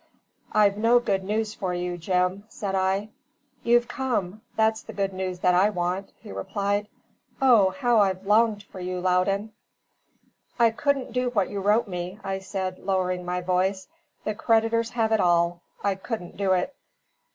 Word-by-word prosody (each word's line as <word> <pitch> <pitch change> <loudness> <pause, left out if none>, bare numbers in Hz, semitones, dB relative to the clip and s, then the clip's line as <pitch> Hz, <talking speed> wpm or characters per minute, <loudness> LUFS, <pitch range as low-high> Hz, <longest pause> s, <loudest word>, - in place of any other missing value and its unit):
"I've 205 -1 +4
no 230 +3 +4
good 195 -5 0
news 215 +2 -1
for 185 -3 -3
you, 175 0 -2
Jim!" 180 +3 0
said 200 -2 -4
I. 190 +2 0 0.5
"You've 240 0 +3
come 220 -7 -2
that's 220 0 +2
the - - -10
good 195 -1 -1
news 185 -1 -3
that 180 - +4
I 185 +4 +4
want," 185 0 -2
he - - -11
replied. 200 - -2 0.5
"O, 240 -8 +6
how 240 0 +2
I've 190 -1 +1
longed 210 0 +3
for 195 - -12
you, 180 0 -3
Loudon!" 195 +4 +1 1.0
"I 235 -2 +5
couldn't 270 0 -1
do 250 0 +1
what 205 -6 0
you 200 - -3
wrote 210 +4 +3
me," 180 +1 -5
I 195 0 -2
said, 190 -1 -4
lowering 185 -2 -1
my 180 0 -2
voice. 185 +2 0 0.4
"The 215 - -1
creditors 225 +1 +2
have 225 -2 0
it 220 - +3
all. 175 -1 +2 0.2
I 200 - +2
couldn't 190 -1 -6
do 195 -1 +1
it." 185 +10 0
195 Hz, 165 wpm, -25 LUFS, 185-220 Hz, 1.0 s, O